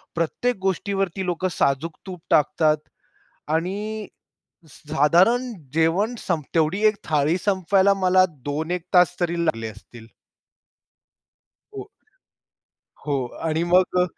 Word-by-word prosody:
प्रत्येक 195 +8 -1
गोष्टीवरती 195 0 -1
लोक 180 0 -2
साजूक 150 +2 -1
तूप 180 -3 -8
टाकतात 155 +1 +3 0.8
आणि 205 +5 -3 0.7
स - - -16
साधारण 190 +12 +3 0.2
जेवण 170 +9 +1
संप 165 -7 -2
तेवढी 165 +4 +1
1 215 - +4
थाळी 155 +1 +1
संपवायला 195 0 +2
मला 185 -1 +4 0.2
2-1 160 +4 -3
तास 180 -1 +5
तरी 170 -1 0
लागले 115 -8 -1
असतील. 110 +2 -13 1.7
हो. 405 -1 -8 1.2
हो 140 -3 0 0.2
आणि 160 +1 0
मग 180 +1 +3
175 Hz, 105 wpm, -23 LUFS, 155-195 Hz, 1.7 s, तास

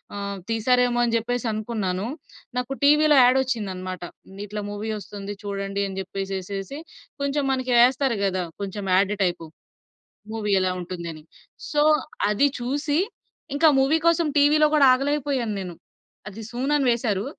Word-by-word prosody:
ఆహ్, 200 0 -4
తీశారేమో 245 +2 +2
అని 235 -1 0
జెప్పేసనుకున్నాను. 220 -4 -2 0.5
నాకు 250 +2 -2
టీవిలో 300 +1 +5
యాడొచ్చిందనమాట. 215 -8 0 0.4
ఇట్లా 210 +1 -5
మూవీ 205 +2 -4
ఒస్తుంది, 200 +1 -7
చూడండి 200 0 -3
అని 190 -1 -7
జెప్పేసేసేసి, 195 +5 -5 0.4
కొంచెం 280 0 0
మనకి 255 -1 -1
యేస్తారు 255 0 +3
గదా! 185 -2 0 0.2
కొంచెం 200 0 -5
యాడ్ 200 +2 +3
టైపు. 175 -3 -2 0.9
మూవీ 210 -2 -2
ఎలా 185 0 +1
ఉంటుందని. 170 -3 -7 0.5
సో, 295 - +1 0.5
అది 245 +8 +3
చూసి, 285 +4 -1 0.6
ఇంకా 315 +2 +6
మూవీ 295 +5 +3
కోసం, 335 0 +2
టీవీలో 300 +1 +5
గూడా 290 -2 +6
ఆగలేకపోయాను 275 -4 -1
నేను. 180 -2 -7 0.6
అది 215 +3 -9
సూన్ 255 +4 -2
అని 275 - +1
వేసారూ. 215 -4 -1
225 Hz, 130 wpm, -24 LUFS, 195-270 Hz, 0.9 s, ఇంకా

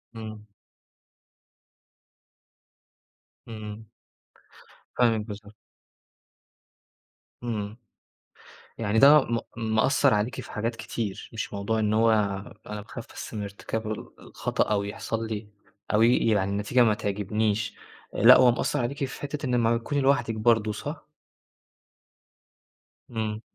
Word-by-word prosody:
إمم. 110 -1 -8 3.0
إمم. 110 -1 -8 1.1
فاهمِك، 115 -3 +3
بالضبط. 105 0 -9 1.9
إمم. 110 -2 -3 1.0
يعني 110 0 +1
ده 145 +3 +8
م 115 -2 -1 0.2
مأثّر 120 +5 +3
عليكِ 105 +4 -1
في - - -11
حاجات 115 +2 -2
كتير، 110 -2 -5
مش 110 - -4
موضوع 100 +3 -1
إن 105 -1 +1
هو 115 +1 +4 0.6
"أنا 105 0 -5
باخاف 115 +2 -9
بس - - -8
من 105 -2 -3
ارتكاب 110 +2 -4
ال 110 - -5
الخطأ - - -1
أو 100 -1 +2
يحصل 110 +2 -4
لي 110 -1 -5 0.5
أو 105 - +4
ي 120 +2 +5
يعني 100 -3 +2
النتيجة 105 +5 +2
ما 110 -2 +4
تعجبنيش." 105 +1 -1 0.4
آآ - - -2
لأ، 120 +4 +10
هو 125 -1 +6
مأثّر 120 - -1
عليكِ 140 +4 -2
في 130 - -9
حتّة 145 +1 -4
إن 125 -1 +1
لمّا 115 -1 +3
بتكوني 140 +5 -2
لوحدِك 135 -4 +2
برضه، 110 -1 +3
صح؟ 145 +8 -6 2.0
إمم. 110 -2 -3
110 Hz, 120 wpm, -26 LUFS, 105-120 Hz, 3.0 s, لأ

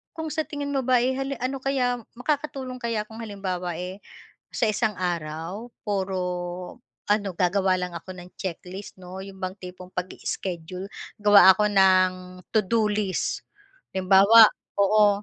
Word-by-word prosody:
kung 320 -1 -4
sa 315 0 -2
tingin 285 -1 -4
mo 275 - +1
ba 250 -2 +4
ay 255 - +2
halim 270 0 -2
ano 265 +1 -2
kaya 255 -2 0 0.2
makakatulong 265 -1 -3
kaya 230 -3 -1
kung 220 +1 -12
halimbawa 185 -5 -4
eh, 180 +3 -6 0.5
sa 235 - 0
isang 215 -1 0
araw, 175 +5 -4 0.2
puro 190 -2 -1 0.9
ano 205 -1 +1
gagawa 185 +1 +2
lang 180 -1 -4
ako 180 +2 -8
ng 180 +1 -11
checklist 190 +1 -7
'no' 185 +1 -8 0.2
bang 185 0 -3
tipong 180 0 -10
pag-ischedule 180 0 -5 0.3
gawa 200 -2 +8
ako 210 +2 +1
ng 185 -2 +5 0.4
to-do 220 0 +2
list. 205 -3 -2 0.5
Halimbawa 195 +4 +7 0.3
oo 205 0 +4
200 Hz, 140 wpm, -25 LUFS, 185-230 Hz, 0.9 s, gawa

